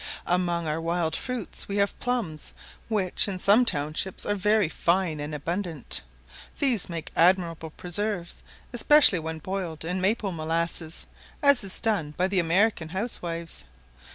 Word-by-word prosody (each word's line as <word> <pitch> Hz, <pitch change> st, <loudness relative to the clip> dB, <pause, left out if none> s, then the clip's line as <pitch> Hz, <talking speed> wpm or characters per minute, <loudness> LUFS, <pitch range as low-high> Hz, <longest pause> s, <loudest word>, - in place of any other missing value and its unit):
Among 175 Hz, -1 st, 0 dB
our 155 Hz, +1 st, -2 dB
wild 165 Hz, -1 st, -1 dB
fruits 250 Hz, -5 st, -2 dB
we 200 Hz, -, -3 dB
have 200 Hz, 0 st, 0 dB
plums, 230 Hz, -, -3 dB, 0.3 s
which, 205 Hz, -5 st, +1 dB
in 195 Hz, -2 st, -3 dB
some 205 Hz, +7 st, +5 dB
townships, 155 Hz, +1 st, 0 dB
are 205 Hz, -, 0 dB
very 210 Hz, 0 st, +2 dB
fine 170 Hz, -1 st, 0 dB
and 150 Hz, +1 st, -5 dB
abundant; 165 Hz, 0 st, -3 dB, 0.6 s
these 250 Hz, -10 st, +3 dB
make 165 Hz, -2 st, -6 dB
admirable 170 Hz, -2 st, +2 dB
preserves, 180 Hz, +2 st, -4 dB, 0.3 s
especially 245 Hz, -, +7 dB
when 160 Hz, 0 st, -5 dB
boiled 170 Hz, -2 st, -5 dB
in 180 Hz, +2 st, -2 dB
maple 200 Hz, +1 st, 0 dB
molasses, 165 Hz, 0 st, -2 dB, 0.4 s
as 280 Hz, -4 st, +5 dB
is 195 Hz, -1 st, -1 dB
done 165 Hz, -10 st, -1 dB
by 185 Hz, -, +2 dB
the 190 Hz, -1 st, +1 dB
American 175 Hz, 0 st, +1 dB
housewives. 170 Hz, -, -3 dB
180 Hz, 140 wpm, -26 LUFS, 165-205 Hz, 0.6 s, especially